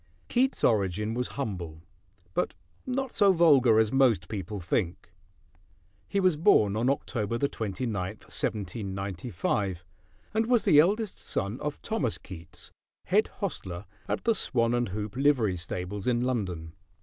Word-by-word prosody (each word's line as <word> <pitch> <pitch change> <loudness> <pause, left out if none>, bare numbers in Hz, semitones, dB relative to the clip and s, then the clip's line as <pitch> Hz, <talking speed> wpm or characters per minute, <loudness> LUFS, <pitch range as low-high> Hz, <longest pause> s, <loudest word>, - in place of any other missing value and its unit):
Keats' 260 +2 +1
origin 105 0 +2
was 125 +1 -1
humble; 85 - -4 0.5
but - - -1 0.3
not 260 0 -2
so 200 -1 +5
vulgar 140 -10 +5
as 110 -1 +3
most 120 -10 +3
people 105 -1 -4
think. 85 +1 -2 1.0
He 200 - 0
was 185 -4 +3
born 110 - +4
on 115 +4 +1
October 115 -5 -1
29, 115 -3 -2
1795, 100 -2 -3 0.5
and 220 +1 +1
was 240 -2 +3
the 150 - +6
eldest 205 +6 +2
son 100 +6 -2
of 150 0 -4
Thomas 140 - -1
Keats, 85 -3 -11 0.3
head - - +3
hostler 90 +1 -5 0.2
at - - -2
the 230 - +3
Swan 120 - +1
and 120 -3 0
Hoop 105 +2 -5
livery 130 -8 +3
stables 90 +4 -4
in 120 -1 +2
London. 95 -10 -2
110 Hz, 135 wpm, -28 LUFS, 95-140 Hz, 1.0 s, the